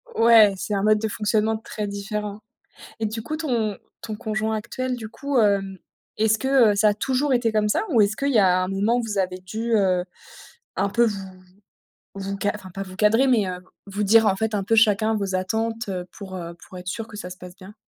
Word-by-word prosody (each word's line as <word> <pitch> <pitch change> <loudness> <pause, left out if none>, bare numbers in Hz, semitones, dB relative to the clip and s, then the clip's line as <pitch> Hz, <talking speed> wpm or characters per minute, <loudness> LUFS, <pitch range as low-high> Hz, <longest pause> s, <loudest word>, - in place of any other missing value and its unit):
Ouais, 225 -3 +6
c'est 210 - -4
un 195 - -1
mode 215 0 +4
de 220 - -1
fonctionnement 215 +1 0
très 215 -1 -5
différent 205 +1 -4 0.6
et 220 - 0
du 220 +1 -4
coup, 305 +8 -4
ton 235 -10 -1 0.2
ton 215 -1 -6
conjoint 220 0 -2
actuel, 255 +4 -3
du 225 -2 -7
coup, 280 +4 -2
hem, 195 -3 +1 0.4
est-ce 220 0 +3
que, 260 -2 +4
heu, - - -1
ça 210 +1 +4
a 205 - +2
toujours 265 +5 0
été 240 -3 +2
comme 215 -1 +1
ça? - - +1
Ou 235 - +4
est-ce 210 +1 +2
qu'il 280 0 0
y 235 - +4
a 185 -1 +3
un 185 - -4
moment 205 +5 +1
où 245 - 0
vous 220 -3 -4
avez 185 -1 -1
dû, 220 +6 -4
heu, 185 -3 +2 0.7
un 200 - +1
peu 235 +4 +3
vous 215 -3 0 1.0
vous 195 0 -4
ca 205 - +2
enfin 195 -3 -9
pas 195 +2 -6
vous 185 -1 -10
cadrer, 220 +6 +4
mais, 225 -6 +3
heu, 180 0 -5 0.3
vous 200 +1 -3
dire 220 +2 +5
en 195 - +3
fait, 220 +2 -2
un 200 -2 -1
peu 225 - +1
chacun 220 0 +4
vos 195 -2 -2
attentes, 225 +4 -2
heu, 185 -2 -3
pour, 190 -3 -8
heu, 170 -1 -6 0.2
pour 185 - -11
être 180 - -11
sûr 225 +4 -4
que 210 - -10
ça 180 -3 -7
se 180 - -10
passe 180 0 -11
bien? 195 +2 -13
210 Hz, 235 wpm, -23 LUFS, 195-225 Hz, 1.0 s, Ouais